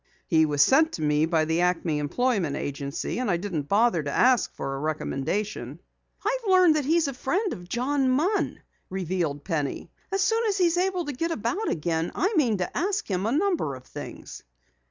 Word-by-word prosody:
"He 160 -1 +3
was 145 -1 +4
sent 315 - +4
to - - -4
me 150 +1 +2
by 160 -2 +2
the 160 +2 +1
Acme 170 -3 +1
Employment 190 - 0
Agency, 140 - -4
and 250 -4 -1
I 175 - +2
didn't 170 -6 -4
bother 210 -4 +3
to 145 - -4
ask 245 - +3
for 135 - -4
a 135 - -4
recommendation." 155 +7 -3 0.5
"I've 465 -1 -1
learned 365 -4 +6
that 300 -3 0
he's 320 +1 +2
a 275 - -3
friend 360 - -1
of 175 0 -10
John 265 +3 +1
Munn," 335 +11 0 0.3
revealed 175 -6 -2
Penny. 150 -5 -3 0.2
"As 390 0 +1
soon 450 +4 +2
as 405 -2 0
he's 350 -2 +2
able 365 -1 0
to 290 - -4
get 330 +6 -2
about 335 - -2
again, 165 +1 -1
I 385 +5 +1
mean 245 - +3
to 180 - -4
ask 400 +3 -1
him 190 +1 -1
a - - 0
number 320 - 0
of 130 - -12
things." - - -9
215 Hz, 195 wpm, -26 LUFS, -, 0.5 s, learned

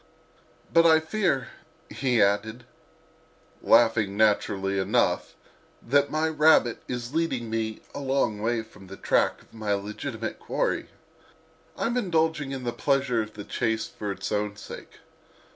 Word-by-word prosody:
"But 165 - +6
I 160 -1 +6
fear," 160 -4 -1 0.4
he 125 -5 +1
added, 105 +4 0 1.0
laughing 115 -4 +4
naturally 100 -2 +2
enough, 95 - +1 0.4
"that 140 +3 +2
my 155 +1 0
rabbit 155 -6 +4
is 125 +1 -5
leading 135 -9 -1
me 110 -1 -2
a - - -5
long 135 -6 0
way 115 0 0
from 105 -3 -16
the 95 +1 -10
track - - +1
of - - -27
my 105 -2 -1
legitimate 110 +3 -5
quarry: - - -1 0.9
I'm 240 +2 -1
indulging 160 - 0
in 135 -2 -5
the 120 -1 -2
pleasure 135 -4 +1
of 110 0 -7
the 105 - -7
chase 115 +1 -1
for 105 -3 -5
its 100 - -5
own 105 -1 -1
sake. 105 - -11
115 Hz, 140 wpm, -26 LUFS, 105-140 Hz, 1.0 s, But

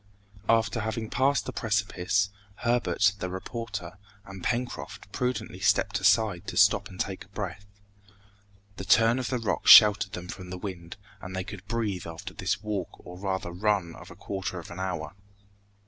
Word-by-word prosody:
After 115 +1 +3
having 110 0 -3
passed 140 +1 +2
the - - -5
precipice, 100 -2 0 0.2
Herbert, 120 -4 +2
the 90 - -3
reporter, 95 -1 -6 0.3
and 95 -2 -10
Pencroft 125 0 -3
prudently 120 -7 -2
stepped 100 +1 +2
aside 100 -2 +2
to - - -5
stop 100 0 +5
and 95 - -12
take 95 -1 -4
breath. 100 -1 -5 1.1
The - - -5
turn 115 +5 +4
of 125 - -2
the 130 - 0
rocks 115 -3 0
sheltered 105 -2 +9
them 90 0 -6
from 90 0 -8
the 90 - -5
wind, 90 -2 -7 0.2
and 95 +1 -7
they 95 - -2
could 100 +1 -10
breathe 105 -6 -2
after 85 +5 -8
this 95 +1 -2
walk 100 -5 -2 0.2
or 90 - -9
rather 95 -2 -2
run 95 -2 0
of - - -12
a - - -11
quarter 95 -1 -4
of 85 - -8
an 85 - -8
hour. 85 -4 -3
100 Hz, 165 wpm, -28 LUFS, 90-110 Hz, 1.1 s, sheltered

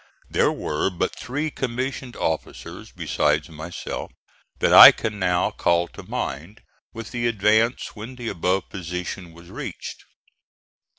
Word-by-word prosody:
There - - +3
were 75 +5 -1
but 90 - -2
three 145 +5 -3
commissioned 130 0 -4
officers 80 -1 -4
besides 75 +2 0
myself, 80 +2 -6 0.5
that - - +2
I - - +13
can 110 -2 -4
now 90 -1 +1
call 85 0 +1
to - - -11
mind, 85 +11 -5 0.3
with 115 -2 -8
the 120 -1 -1
advance 110 +2 +1
when 115 +4 -8
the 120 -2 -7
above 95 0 0
position 90 0 -6
was 85 +1 -15
reached. - - -7
95 Hz, 130 wpm, -23 LUFS, 85-120 Hz, 0.5 s, I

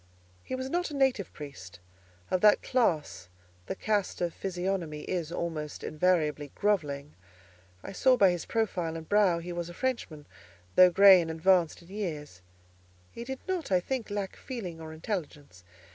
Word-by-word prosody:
He 260 - -4
was 260 0 -4
not 350 +5 -1
a 295 - -6
native 265 -9 +1
priest: 105 -11 -10 0.5
of 185 - +1
that 210 -1 +5
class, 160 - 0 0.4
the - - -3
cast 210 -1 -1
of 175 -2 -1
physiognomy 180 -4 -3
is, 170 -2 -3
almost 160 -4 -4
invariably, 155 -3 0
grovelling: 150 -8 -1 0.7
I - - -7
saw 255 +6 +3
by 195 -4 +6
his 175 -2 -4
profile 180 -8 -1
and 160 -1 -9
brow 205 -4 +4
he 175 +1 -6
was 175 0 -4
a 175 - -10
Frenchman; 210 - -3 0.5
though 185 0 +8
grey 195 0 +8
and 165 - -4
advanced 170 +1 +2
in 170 - -18
years, 155 - -5 0.7
he 235 - -7
did 265 +2 -6
not, 365 - -2
I 185 - +5
think, 245 +5 -4
lack 205 -2 -3
feeling 185 -11 -7
or 160 -1 -8
intelligence. 150 - -6
180 Hz, 160 wpm, -29 LUFS, 155-210 Hz, 0.7 s, though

